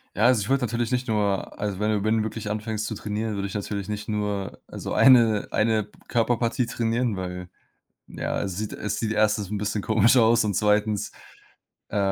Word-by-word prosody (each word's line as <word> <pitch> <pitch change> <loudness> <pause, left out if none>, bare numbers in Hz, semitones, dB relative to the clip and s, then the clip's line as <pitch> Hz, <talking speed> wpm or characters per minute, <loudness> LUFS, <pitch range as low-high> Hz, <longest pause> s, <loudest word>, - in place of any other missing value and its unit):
Ja, 105 - 0
also, 125 -3 +5
ich 105 - -4
würde 135 -2 +2
natürlich 120 0 -2
nicht 125 0 -1
nur 105 -3 -1
also, 100 -2 -3
wenn 105 - +1
du 105 -2 0
wenn 110 +1 +2
du 110 - +1
wirklich 110 -1 -5
anfängst 110 0 -3
zu 110 - -4
trainieren, 105 +1 -3
würde 100 0 -2
ich - - -8
natürlich 100 -1 -4
nicht 105 0 -5
nur, 105 -2 -3
also, - - -7
eine 115 -5 +5
eine 110 -1 +1 0.2
Körperpartie 120 +1 +1
trainieren, 115 -1 -1
weil 90 -1 -5 0.6
ja, - - -3
es 95 -3 -4
sieht 105 -1 -4
es 105 - -3
sieht 110 -1 -1
1. 105 -2 +1
'n 105 - -2
bisschen 105 0 -2
komisch 110 +3 +4
aus 115 -1 +4
und 105 - 0
2., 105 +1 +1 0.8
äh, - - -3
105 Hz, 200 wpm, -25 LUFS, 105-115 Hz, 0.8 s, also